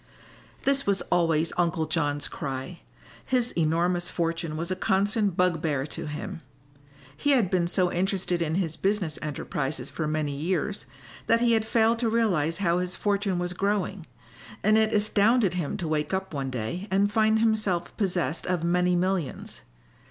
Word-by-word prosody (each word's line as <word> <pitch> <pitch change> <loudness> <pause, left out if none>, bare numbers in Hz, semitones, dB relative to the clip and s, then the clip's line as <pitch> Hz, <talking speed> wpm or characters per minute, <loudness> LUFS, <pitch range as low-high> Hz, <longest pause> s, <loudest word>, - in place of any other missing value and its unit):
This 275 -2 +2
was 195 -3 +2
always 165 -2 +2
Uncle 170 -2 +1
John's 145 -2 -1
cry. 135 +5 -5 0.4
His 245 -2 +1
enormous 175 +2 +1
fortune 165 -2 -2
was 170 +3 -3
a - - +1
constant 200 +1 +1
bugbear 165 -6 +1
to 155 - -5
him. 150 +2 -5 0.8
He 290 - +2
had 225 -9 +2
been 175 -2 +2
so 180 0 +2
interested 185 -1 0
in 160 -1 0
his 165 -4 -1
business 190 -2 0
enterprises 140 -2 -3
for 155 - -3
many 155 -1 -1
years 170 +5 -2 0.4
that 230 0 +4
he 240 -1 +4
had 220 -1 +2
failed 225 +1 +2
to 235 -2 +1
realize 180 -9 +1
how 175 -3 +1
his 180 0 -2
fortune 200 -2 0
was 175 0 -2
growing, 195 -2 -1 0.6
and 215 +1 +4
it 220 0 +3
astounded 210 0 +3
him 175 -5 -2
to 170 - -3
wake 155 +3 0
up 190 -2 -4
one 135 -2 -2
day 130 - -4
and 200 +2 +2
find 220 0 +4
himself 215 -6 0
possessed 175 - -1
of 180 -2 0
many 180 +1 +2
millions. 180 -4 -2
180 Hz, 160 wpm, -27 LUFS, 160-205 Hz, 0.8 s, that